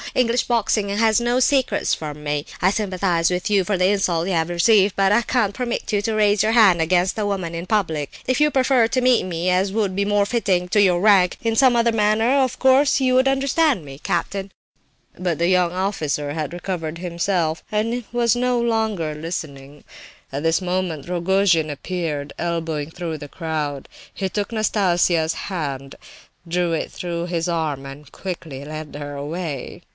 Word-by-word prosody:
English 245 -1 +2
boxing 220 -3 0
has 220 +3 +2
no 240 +1 +1
secrets 265 0 +1
from 150 -1 -5
me. 145 -1 -2 0.2
I 185 - +4
sympathize 185 -5 0
with 180 +2 -2
you 200 -2 +3
for 200 +1 -1
the 180 - +2
insult 180 -4 0
you 195 - -1
have 165 0 0
received, 195 +3 +3
but 195 0 +3
I 220 +3 +4
can't 230 -4 0
permit 240 -1 -3
you 205 - +2
to 220 +2 -2
raise 210 -1 +3
your 220 - +2
hand 205 -7 +5
against 180 +4 +1
a 210 - -1
woman 185 -5 -3
in 170 +1 -5
public. 165 -9 -1 0.2
If 255 +3 +1
you 300 0 +4
prefer 260 -3 +3
to 255 - 0
meet 250 -5 +3
me—as 185 +2 0
would 200 -3 -1
be 200 - +1
more 205 0 +2
fitting 195 -5 0
to 205 - +3
your 180 -3 +3
rank—in 205 +3 +3
some 250 0 +4
other 235 0 +2
manner, 220 +3 +2
of 255 - -3
course 270 +2 +4
you 255 -1 +3
understand 270 - +1
me, 135 0 -10
captain." 190 +5 -3 0.7
But 175 -4 -1
the 170 - +1
young 180 -2 +2
officer 160 -6 -2
had 155 -1 -3
recovered 175 -3 -4
himself, 170 -1 -1
and 230 +3 -1
was 235 -2 +2
no 250 0 +1
longer 220 -9 -1
listening. 150 -3 -7 0.5
At 140 +2 -4
this 165 +3 +2
moment 180 -5 -2
Rogojin 175 -2 +2
appeared, 150 -1 -4
elbowing 165 -3 -3
through 165 -3 -5
the 145 - -9
crowd; 150 -4 -4 0.3
he 195 - -2
took 205 +3 -3
Nastasia's 180 -7 +1
hand, 140 -7 -4 0.5
drew 175 0 -1
it 160 - -3
through 170 -1 -4
his 170 -1 -2
arm, 155 -5 -2
and 140 +1 -11
quickly 160 -7 -7
led 155 0 -7
her 145 0 -6
away. 145 -1 -5
185 Hz, 175 wpm, -21 LUFS, 165-215 Hz, 0.7 s, hand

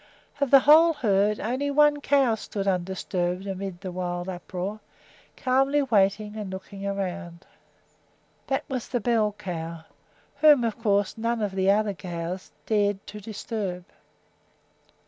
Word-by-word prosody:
Of 280 -2 +1
the 275 0 +8
whole 320 +4 +7
herd, 210 -5 +1
only 260 +6 -1
one 295 0 +4
cow 275 -5 +3
stood 205 -2 -4
undisturbed 180 0 -1
amid 195 -2 -5
the 185 -2 -5
wild 175 0 -3
uproar, 185 +3 -5 0.6
calmly 270 +3 +2
waiting 210 -3 +1
and 210 -3 -5
looking 195 +1 -7
about. 185 -3 -4 1.0
That 270 - 0
was 255 -3 -4
the 245 - -1
bell 220 -2 +1
cow, 165 -4 -6 0.5
whom, 295 -3 +6
of 230 0 -2
course, 205 -2 +1
none 230 +1 0
of 205 - -1
the 190 0 +1
other 205 0 +2
cows 175 0 -6 0.2
dared 205 -2 +1
to 210 0 -9
disturb. 205 -4 -5
205 Hz, 135 wpm, -26 LUFS, 190-235 Hz, 1.0 s, the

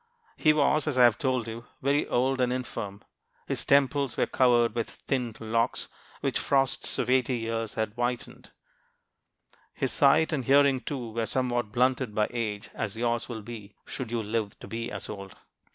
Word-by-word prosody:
He 155 - +4
was, 155 0 +2
as 145 -4 0
I 125 - +7
have 120 -2 +7
just - - -21
told 130 -4 0
you, 115 +1 -7
very 140 +2 +1
old 130 +2 +1
and 125 -1 +2
infirm. 110 -5 -4 0.4
His - - -1
temples 140 -1 +2
were - - +3
covered 120 -3 +3
with 115 -1 -2
thinned 125 -4 -3
locks 115 +1 0 0.3
which - - 0
the - - -2
frosts 135 -2 +1
of - - 0
eighty 130 0 +2
years 115 -1 -3
had 110 -2 -1
whitened. 120 +1 -3 1.3
His - - -1
sight, 155 +3 +4
and 135 -4 0
hearing, 140 -1 +5
too, 125 -6 -5
were 115 0 -2
somewhat 120 -2 -1
blunted 125 -1 +1
by 105 -1 +2
age, 110 -4 -3
as 105 +1 -4
yours 120 0 -1
will 110 -3 -6
be 105 -2 -9
should 125 -4 -5
you 115 -2 -1
live 105 -1 -2
to - - -8
be 115 +1 -4
as - - -6
old. 100 -2 -8
120 Hz, 185 wpm, -28 LUFS, 115-130 Hz, 1.3 s, I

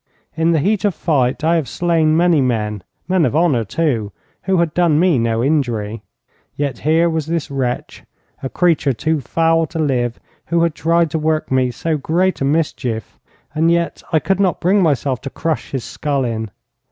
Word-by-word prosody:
In 165 +1 +2
the 165 - +3
heat 200 +8 +1
of 205 -4 +1
fight 135 -3 0
I 165 +2 +3
have 145 -7 -2
slain 160 -1 +1
many 170 -3 +3
men 105 -5 -1 0.3
men 185 -1 +2
of 135 -1 0
honour, 155 -8 +2
too, 115 -3 -1 0.3
who 190 0 0
had 170 -2 +1
done 170 -4 +3
me 175 -6 +3
no 115 0 0
injury. 120 -7 -1 0.5
Yet 140 -2 -3
here 160 +3 +2
was 160 -2 -2
this 165 -3 -2
wretch, 130 -3 -3 0.4
a 135 - -4
creature 160 -5 +2
too 155 +6 -1
foul 165 +4 +1
to 165 - -7
live, 125 -6 0 0.3
who 170 0 +2
had 170 -2 +1
tried 165 0 +1
to 160 - -1
work 155 -1 -1
me 130 -1 +2
so 155 +6 -2
great 175 +6 0
a - - +1
mischief, 135 -7 -2 0.3
and 160 +2 +2
yet 170 0 0
I 160 - +3
could 195 +4 0
not 190 -3 +1
bring 195 +3 +3
myself 140 -6 0
to 135 - -5
crush 160 +2 -3
his 135 -3 -4
skull 140 -3 -2
in. 110 -2 -3
155 Hz, 190 wpm, -18 LUFS, 130-170 Hz, 0.5 s, the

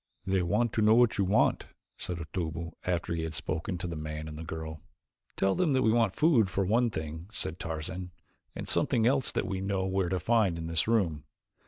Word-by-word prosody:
"They 95 -1 +1
want 105 +6 +1
to 110 - +1
know 110 +1 +6
what 120 -3 +4
you 100 - +3
want," 100 +4 +2 0.3
said 90 - -4
Otobu, 85 0 -4
after 85 -1 -1
he 85 - -1
had 80 -1 -4
spoken 80 +3 -3
to 90 - -5
the 85 -2 -4
man 75 0 -5
and 75 - -7
the 80 - -7
girl. 80 -1 -6 0.5
"Tell 95 0 +2
them 170 -6 +1
that 130 -1 +3
we 110 - +4
want 115 -5 +2
food 130 - +4
for 95 +1 0
one 115 +5 +3
thing," 80 -1 -6
said 85 -6 -4
Tarzan, 85 +3 -4 0.5
"and - - -5
something 115 -2 +2
else 135 +2 +2
that - - -1
we 95 0 -3
know 95 -1 -1
where 95 -1 0
to 95 0 0
find 110 -7 +2
in 80 - -5
this 80 +2 0
room. 95 -10 +1
90 Hz, 215 wpm, -29 LUFS, 80-110 Hz, 0.5 s, know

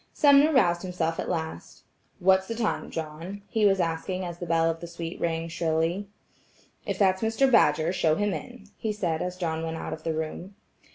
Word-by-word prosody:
Sumner 285 +1 +6
roused 175 - +3
himself 175 -3 -2
at - - -3
last: 160 - -5 0.3
"What's 190 +1 +3
the 230 - -3
time, 225 -2 -1
John?" 165 +6 -6
he 220 -2 +1
was 195 -1 +3
asking 180 +2 -2
as 175 -1 -6
the 175 - -5
bell 165 0 +3
of 165 0 -1
the 170 - -7
suite 170 0 -7
rang 165 -1 -1
shrilly. 165 +3 -1 0.8
"If - - -1
that's 190 -2 +3
Mr. 225 +4 +2
Badger, 160 -6 +4
show 160 -4 +2
him 205 +2 0
in," 245 -3 -7 0.2
he 220 -1 -1
said 170 -6 -1
as 180 0 -3
John 160 -3 -2
went 165 0 -3
out - - -5
of 160 - -7
the 160 0 -2
room. 160 +5 -5
175 Hz, 195 wpm, -27 LUFS, 165-200 Hz, 0.8 s, Sumner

